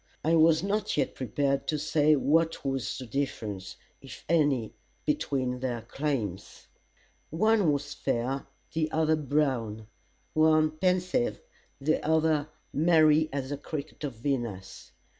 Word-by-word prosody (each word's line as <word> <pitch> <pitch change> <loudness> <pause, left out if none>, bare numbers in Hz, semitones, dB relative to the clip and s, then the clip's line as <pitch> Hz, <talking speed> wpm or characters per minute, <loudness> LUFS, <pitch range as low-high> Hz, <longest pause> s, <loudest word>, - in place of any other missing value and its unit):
I 160 - +2
was 160 0 +5
not 205 -1 -1
yet 145 - +1
prepared 135 +3 -1
to 155 - 0
say 150 0 +3
what 160 +3 +1
was 135 -5 -2
the 130 - -6
difference, 110 -6 -4 0.3
if - - -11
any, 145 -8 +2 0.3
between 135 -4 -1
their 120 -3 -3
claims. 120 - -4 0.6
One 205 0 +3
was 145 0 -2
fair, 130 0 -2 0.3
the 155 -1 0
other 160 0 +2
brown; 130 -8 -1 0.5
one 155 0 +4
pensive, 185 +8 0 0.4
the 155 +3 0
other 155 -1 +2 0.2
merry 155 -1 +4
as 135 0 -4
the 145 - -2
cricket 150 +1 -7
of 140 -5 -3
Venus. 115 -7 -4
145 Hz, 125 wpm, -28 LUFS, 130-160 Hz, 0.6 s, was